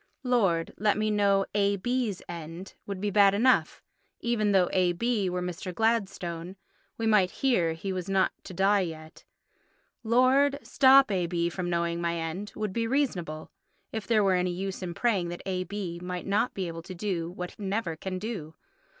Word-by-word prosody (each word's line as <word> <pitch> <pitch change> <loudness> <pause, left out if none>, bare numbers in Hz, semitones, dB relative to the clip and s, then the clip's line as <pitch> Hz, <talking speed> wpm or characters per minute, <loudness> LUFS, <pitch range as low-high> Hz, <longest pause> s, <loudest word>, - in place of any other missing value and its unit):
"Lord, 195 -10 +1
let 210 +1 +2
me 215 0 +1
know 200 -2 +3
A.B.'s 205 +2 0
end" 170 +2 -8
would 200 -2 -4
be 205 +1 -1
bad 200 -1 +5
enough. 255 +5 +2 0.4
Even 220 -3 +1
though 190 -2 +4
A.B. 190 +3 +1
were 180 0 -2
Mr. 180 +1 -5
Gladstone—we 195 -2 -3
might 210 -4 +4
hear 185 -12 +1
he 190 +4 -4
was 185 0 -4
not 195 -1 +2
to - - -8
die 195 +3 +3
yet. 160 -3 -6 0.8
"Lord, 260 +5 +4
stop 270 -2 +6
A.B. 170 -2 0
from 175 +1 -3
knowing 170 0 -1
my 170 0 0
end" 170 +5 -4
would 215 -3 -3
be 230 +1 -1
reasonable, 185 - -2 0.4
if 220 -3 -5
there 220 -3 +3
were 195 -1 +3
any 180 0 +1
use 190 +2 -4
in 175 -2 -5
praying 200 -7 +1
that 175 - -7
A.B. 185 -1 -3
might 180 0 -5
not 205 +5 0
be 190 -2 -2
able 165 0 -6
to 185 +2 -9
do 175 -3 -2
what 180 0 -6
he 210 - -11
never 195 -3 -2
can 185 +3 -5
do. 185 -7 -5
190 Hz, 170 wpm, -28 LUFS, 175-215 Hz, 0.8 s, stop